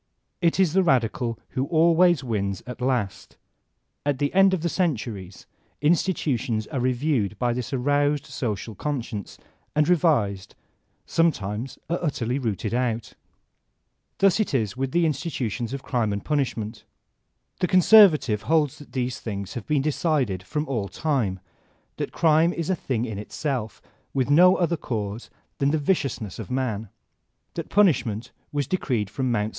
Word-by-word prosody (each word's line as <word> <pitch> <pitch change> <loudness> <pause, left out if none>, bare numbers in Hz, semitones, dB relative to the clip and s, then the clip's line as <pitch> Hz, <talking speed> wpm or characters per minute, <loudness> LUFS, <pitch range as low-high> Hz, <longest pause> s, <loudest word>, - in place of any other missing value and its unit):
It 170 +1 +2
is 180 -5 +3
the 190 - +4
radical 120 - +1
who 130 +2 -2
always 170 -1 +4
wins 100 -6 -2
at 125 +1 -8
last 125 -6 -2 0.7
At 145 -2 0
the 145 +1 -1
end 195 +1 +6
of 190 -4 0
the 170 - 0
centuries 115 - -2 0.3
institutions 145 - +1
are 135 - -4
reviewed 125 -4 0
by 120 -1 +1
this 120 -1 -4
aroused 145 +2 +1
social 110 -2 -4
conscience, 115 -5 -4 0.4
are 150 - +4
revised, 140 - +1 0.5
sometimes 120 -7 0
are 170 - -1
utterly 130 -5 -1
rooted 110 -3 -2
out. 120 -3 -1 1.0
Thus 195 +1 +4
it 210 -9 0
is 110 -6 0
with 130 0 -2
the 170 +2 +2
institutions 130 - -2
of 140 0 -5
Crime 120 -5 0
and 100 0 -4
Punish 145 -5 0
ment. 110 +1 -6 0.8
The 180 - +1
conservative 175 - +6
holds 155 -4 +1
that 145 - -14
these 125 -2 -2
things 100 -3 -5
have 120 -4 -6
been 145 -3 +1
decided 140 - 0
from 150 +12 -3
all 115 -7 -2
time; 110 - -1 0.6
that - - -3
crime 165 +1 +3
is 170 +2 -2
a - - +2
thing 125 -7 -2
in 110 -4 -5
itself, 115 -2 -4 0.3
with 135 +1 +1
no 180 +5 +7
other 170 -1 +1
cause 110 -4 -4 0.3
than 140 - +3
the 155 - +2
viciousness 135 - -1
of - - -6
man; 115 -5 -2 0.6
that - - -5
punish 190 -12 +4
ment 110 -1 -5 0.2
was 145 -1 -1
decreed 125 - -1
from 130 +5 -2
Mt. 105 -2 0
130 Hz, 155 wpm, -25 LUFS, 110-155 Hz, 1.0 s, no